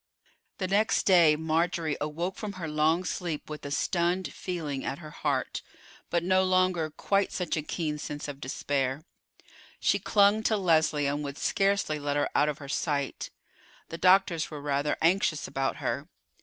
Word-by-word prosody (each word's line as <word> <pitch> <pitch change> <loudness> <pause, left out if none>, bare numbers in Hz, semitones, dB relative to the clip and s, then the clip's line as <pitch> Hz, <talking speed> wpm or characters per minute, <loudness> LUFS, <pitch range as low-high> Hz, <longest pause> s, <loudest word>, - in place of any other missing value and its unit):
The 185 - -2
next 205 +3 +2
day 170 -5 +6
Marjorie 160 0 0
awoke 165 +5 -2
from 210 -3 -5
her 180 -4 -5
long 155 +3 +2
sleep 170 -5 -4
with 150 - -7
a - - -5
stunned 175 +4 0
feeling 155 -7 -4
at 135 - -3
her 155 -1 -10
heart, 140 -4 -2 0.5
but 170 -1 0
no 185 +1 +3
longer 185 -3 +2
quite 195 +6 0
such 180 -3 -2
a 155 - -1
keen 150 -1 -3
sense 145 0 -5
of 140 -1 -7
despair. 135 +1 -2 0.8
She - - +2
clung 205 +1 +4
to 220 0 +1
Leslie, 160 -5 +2
and 145 +1 -1
would 140 0 -5
scarcely 195 -6 +1
let 145 0 -1
her 145 - +1
out 150 - +3
of 150 - -3
her 140 - -10
sight. 140 -1 -2 0.6
The 165 - -6
doctors 180 -3 +4
were 150 - -7
rather 145 0 -1
anxious 170 -2 +2
about 135 0 -1
her. - - -3
160 Hz, 170 wpm, -28 LUFS, 145-185 Hz, 0.8 s, day